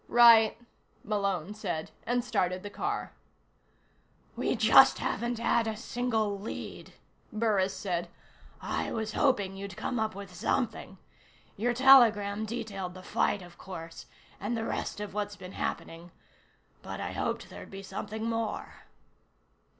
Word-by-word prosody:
"Right," 230 -2 +7 0.5
Malone 200 -3 -1
said, 180 -7 -4 0.2
and 245 0 +1
started 185 -6 0
the 205 - -6
car. 410 - -3 1.2
"We - - 0
just - - +7
haven't 240 0 -2
had 230 0 +2
a 220 -1 -2
single 220 -3 -1
lead," 205 - -7 0.4
Burris 210 -4 +1
said. 175 -3 -2 0.5
"I - - -2
was 220 -1 -3
hoping 205 -8 +2
you'd 195 -1 -7
come 245 - -2
up 220 -1 -1
with 200 -2 -8
something. 215 +1 -2 0.6
Your 240 +4 0
telegram 220 -6 +6
detailed 200 -5 -5
the 185 - -10
fight, 200 0 0
of 175 -1 -15
course, 165 -3 -8 0.3
and 220 +4 -2
the 225 - -2
rest - - -3
of 210 -2 -5
what's 205 0 -3
been 185 -2 -10
happening 170 -1 -4 0.7
but - - -6
I - - -3
hoped - - -3
there'd - - -9
be 195 0 -8
something 220 +3 -5
more." 225 -1 -3
210 Hz, 135 wpm, -30 LUFS, 195-230 Hz, 1.2 s, Right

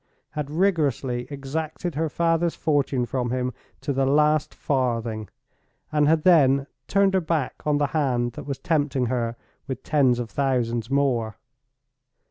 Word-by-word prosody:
—had 150 -2 -4
rigorously 145 - 0
exacted 155 +4 -4
her 160 +2 -1
father's 165 +1 +1
fortune 140 -4 +1
from 125 0 -2
him 125 0 -1 0.3
to 140 +1 -2
the 135 +1 +1
last 150 +2 +3
farthing; 115 -6 -1 0.6
and 150 -1 +3
had 155 0 +3
then 140 -6 +5 0.2
turned 195 -1 +3
her 190 - +3
back 160 -5 -2
on 150 -1 +3
the 145 - +2
hand 125 -6 +1
that 120 - -9
was 140 -2 -3
tempting 145 -4 0
her 115 -2 -1 0.3
with 130 -2 -5
tens 135 -5 +3
of 120 -2 -4
thousands 120 -4 0
more! 125 -6 +1
140 Hz, 145 wpm, -24 LUFS, 125-155 Hz, 0.6 s, then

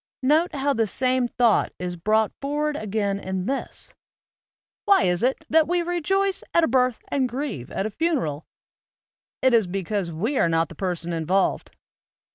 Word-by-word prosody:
Note 310 +5 +2
how 280 +1 +1
the 225 -3 +1
same 255 +3 +1
thought 235 -2 +2
is 180 -1 -4
brought 215 +5 +1
forward 295 +2 -1
again 205 -4 -2
in 190 -1 -4
this: 270 +4 -5 0.9
"Why 400 -1 +5
is 180 0 +1
it 260 +5 0
that 320 -1 +4
we 350 +1 +1
re 350 0 -2
joice 390 +3 +1
at 340 - +5
a - - +4
birth 250 -1 +2
and 265 -3 0
grieve 245 - -4
at 195 - -3
a 215 - -3
funeral? 245 - -1 1.0
It 260 -1 +4
is 225 -5 +4
because 195 0 -2
we 220 - -1
are 170 - +3
not 165 -1 +1
the - - -10
person 175 -1 -3
involved." 170 +4 0
235 Hz, 170 wpm, -24 LUFS, 185-290 Hz, 1.0 s, Why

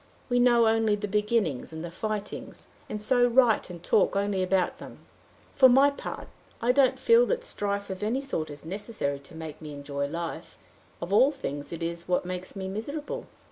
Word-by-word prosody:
We 245 0 +2
know 240 -1 +5
only 220 -1 +3
the 205 0 -4
beginnings 210 - 0
and 160 +1 -6
the 170 - -7
fightings, 210 +3 -5 0.2
and 210 - -4
so 245 +3 +3
write 240 -4 +3
and 175 -1 -9
talk 195 - +3
only 200 -1 0
about 185 0 +1
them. - - -12 0.5
For 260 -1 +7
my 270 +3 +6
part, 280 - -7 0.3
I 240 +2 +3
don't 265 0 +3
feel 465 +1 +5
that - - -1
strife 200 - -3
of 190 +1 -6
any 225 +5 0
sort 270 - -3
is 145 +1 -10
necessary 190 -6 -3
to 140 +4 -15
make 160 -1 -8
me 150 -2 -7
enjoy 140 0 -3
life; 165 +2 -6 0.5
of 175 +3 -4
all 255 +7 +6
things 145 - -5
it 170 0 -5
is 170 0 -3
what 180 0 +1
makes 185 +1 -5
me 190 -1 -4
miserable. 285 +10 -5
200 Hz, 190 wpm, -27 LUFS, 170-240 Hz, 0.5 s, For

